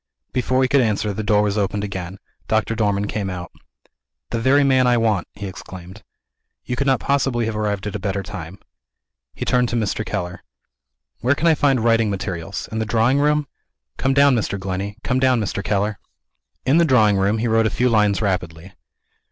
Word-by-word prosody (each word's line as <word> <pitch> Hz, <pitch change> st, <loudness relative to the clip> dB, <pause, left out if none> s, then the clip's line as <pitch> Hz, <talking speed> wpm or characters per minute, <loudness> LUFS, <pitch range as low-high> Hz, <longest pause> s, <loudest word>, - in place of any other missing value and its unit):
Before 130 Hz, +1 st, +1 dB
he -, -, +3 dB
could 140 Hz, +1 st, +3 dB
answer, 105 Hz, -2 st, 0 dB
the 110 Hz, -, -3 dB
door 105 Hz, -1 st, +2 dB
was 105 Hz, 0 st, 0 dB
opened 100 Hz, +1 st, -1 dB
again. 95 Hz, -2 st, -5 dB, 0.3 s
Doctor 110 Hz, 0 st, +1 dB
Dormann 105 Hz, -2 st, 0 dB
came 100 Hz, -2 st, -3 dB
out. 90 Hz, -2 st, -6 dB, 0.8 s
"The 115 Hz, -, -1 dB
very 135 Hz, +5 st, +4 dB
man 130 Hz, -2 st, +3 dB
I 120 Hz, -1 st, +4 dB
want!" 110 Hz, -5 st, +1 dB
he 100 Hz, -, -7 dB
exclaimed. 95 Hz, +1 st, -10 dB, 0.6 s
"You 125 Hz, -, -2 dB
could 140 Hz, +2 st, -1 dB
not 130 Hz, -2 st, +3 dB
possibly 135 Hz, -4 st, 0 dB
have 110 Hz, -1 st, -3 dB
arrived 105 Hz, -2 st, -2 dB
at 105 Hz, -, -4 dB
a -, -, -3 dB
better 100 Hz, +1 st, -2 dB
time." 95 Hz, -1 st, -8 dB, 0.8 s
He -, -, -4 dB
turned 125 Hz, -1 st, +2 dB
to -, -, -2 dB
Mr. 110 Hz, -1 st, -1 dB
Keller. 90 Hz, -5 st, -4 dB, 0.8 s
"Where 130 Hz, +5 st, +2 dB
can 155 Hz, -, -2 dB
I 165 Hz, -, +6 dB
find 135 Hz, -5 st, +2 dB
writing 115 Hz, -2 st, +3 dB
materials? 95 Hz, -1 st, -4 dB
In 110 Hz, -, -2 dB
the -, -, 0 dB
drawing 115 Hz, +5 st, +2 dB
room? 150 Hz, 0 st, +2 dB, 0.5 s
Come 135 Hz, 0 st, 0 dB
down, 140 Hz, 0 st, +5 dB
Mr. 105 Hz, -3 st, -1 dB
Glenney. 95 Hz, +2 st, -4 dB
Come 125 Hz, -, 0 dB
down, 130 Hz, -2 st, +3 dB
Mr. 100 Hz, -1 st, -3 dB
Keller." 105 Hz, +1 st, -1 dB, 0.7 s
In 140 Hz, +6 st, +4 dB
the -, -, +5 dB
drawing 110 Hz, -8 st, +4 dB
room, 100 Hz, +3 st, +1 dB
he 115 Hz, +2 st, -1 dB
wrote 115 Hz, 0 st, +3 dB
a -, -, +1 dB
few 125 Hz, -, +1 dB
lines 105 Hz, -3 st, +2 dB
rapidly. 90 Hz, -2 st, -3 dB
110 Hz, 195 wpm, -21 LUFS, 100-125 Hz, 0.8 s, I